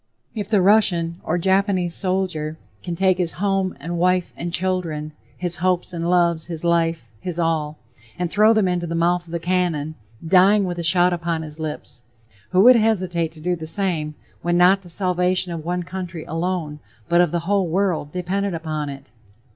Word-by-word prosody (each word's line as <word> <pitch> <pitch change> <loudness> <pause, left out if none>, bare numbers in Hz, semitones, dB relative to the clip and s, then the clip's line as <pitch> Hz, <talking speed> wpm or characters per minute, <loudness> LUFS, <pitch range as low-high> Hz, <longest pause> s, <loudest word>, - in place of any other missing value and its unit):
If 210 -3 -5
the 205 -4 +3
Russian 175 -5 +3
or 170 - -1
Japanese 190 -1 +1
soldier 180 -5 -1 0.2
can 175 -1 -4
take 185 +1 +2
his 175 -2 0
home 195 -2 -1
and 170 +4 -4
wife 180 0 +1
and 170 0 -5
children, 170 -4 -2 0.3
his 175 -1 -1
hopes 180 0 0
and 170 0 -2
loves, 170 -2 +2
his 170 -1 -3
life, 165 -7 0
his 175 +6 -4
all, 160 -3 -1 0.4
and 175 -1 -2
throw 215 +1 +5
them 215 -4 +3
into 175 -1 -1
the 165 - -3
mouth 175 +1 +1
of - - -12
the 170 - -1
cannon, 170 -3 -1 0.3
dying 195 +4 +5
with 175 -1 -4
a - - -3
shout 175 +1 +4
upon 170 -2 -2
his 155 0 -10
lips, 150 -5 -6 0.5
who 185 +1 +3
would 250 +1 +8
hesitate 185 -7 0
to 160 - -14
do 175 +3 -1
the 160 -2 -8
same, 160 -5 -1 0.3
when 175 +1 +1
not 185 +2 +5
the 180 - -14
salvation 180 0 0
of 165 -2 -5
one 175 +2 -2
country 180 -2 -6
alone, 165 -3 -3 0.3
but 175 0 +4
of 175 - +3
the 170 -1 -1
whole 195 +1 +1
world, 175 -4 0
depended 185 +2 -2
upon 155 -3 -3
it? 135 -1 -9
175 Hz, 185 wpm, -22 LUFS, 165-185 Hz, 0.5 s, would